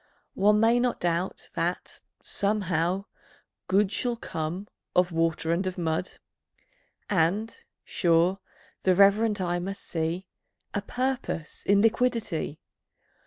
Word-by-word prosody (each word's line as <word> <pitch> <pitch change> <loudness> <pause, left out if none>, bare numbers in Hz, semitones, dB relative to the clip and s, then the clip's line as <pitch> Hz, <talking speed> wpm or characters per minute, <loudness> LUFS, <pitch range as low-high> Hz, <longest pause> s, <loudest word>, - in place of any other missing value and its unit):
One 210 +2 +4
may 230 +2 +4
not 245 0 0
doubt 175 +2 -2
that, - - -3 0.2
somehow, 190 -2 0 0.6
Good 195 +1 +3
Shall 240 +1 0
come 175 -2 -4 0.3
of 180 0 +3
Water 165 0 0
and 185 +3 0
of 185 - -4
Mud; 165 +1 -1 0.9
And, 195 +5 +1 0.3
sure, 175 +2 +2 0.4
the 185 -1 +3
reverent 205 +2 +4
eye 175 -1 0
must 195 +3 -5
see 165 +3 -2 0.5
A 205 - -1
Purpose 250 - -3
in 200 0 +5
Liquidity. 225 - 0
190 Hz, 115 wpm, -27 LUFS, 170-210 Hz, 0.9 s, in